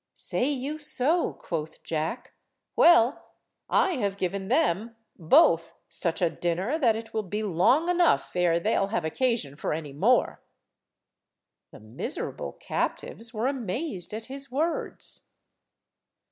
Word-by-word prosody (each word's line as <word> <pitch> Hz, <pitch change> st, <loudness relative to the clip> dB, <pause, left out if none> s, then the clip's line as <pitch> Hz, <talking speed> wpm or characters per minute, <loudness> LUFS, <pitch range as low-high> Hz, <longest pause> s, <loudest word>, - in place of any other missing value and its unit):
"Say 255 Hz, -, -1 dB
you 290 Hz, +2 st, -3 dB
so," 310 Hz, +3 st, 0 dB
quoth 160 Hz, -2 st, -6 dB
Jack; 160 Hz, +9 st, -3 dB, 0.4 s
"well, 285 Hz, -6 st, +4 dB, 0.4 s
I 360 Hz, -6 st, +3 dB
have 200 Hz, -4 st, -1 dB
given 190 Hz, +1 st, -2 dB
them, 230 Hz, -, +1 dB, 0.2 s
both 165 Hz, 0 st, +4 dB
such 170 Hz, +1 st, -1 dB
a 170 Hz, -, +4 dB
dinner 185 Hz, -, -1 dB
that 235 Hz, -7 st, +3 dB
it 225 Hz, 0 st, -7 dB
will 220 Hz, -, 0 dB
be 210 Hz, +2 st, -4 dB
long 210 Hz, -, +3 dB
enough 355 Hz, -, +2 dB
e'er 175 Hz, -2 st, +3 dB
they'll 195 Hz, 0 st, +1 dB
have 200 Hz, -5 st, -2 dB
occasion 220 Hz, -, 0 dB
for 150 Hz, -, -2 dB
any 150 Hz, -3 st, -5 dB
more." 220 Hz, -, +2 dB, 1.3 s
The -, -, -13 dB
miserable -, -, -5 dB
captives 225 Hz, 0 st, -4 dB
were 225 Hz, 0 st, -2 dB
amazed 245 Hz, -, -3 dB
at 220 Hz, +1 st, -5 dB
his 275 Hz, +1 st, -7 dB
words. 315 Hz, +6 st, -2 dB
220 Hz, 130 wpm, -27 LUFS, 175-270 Hz, 1.3 s, well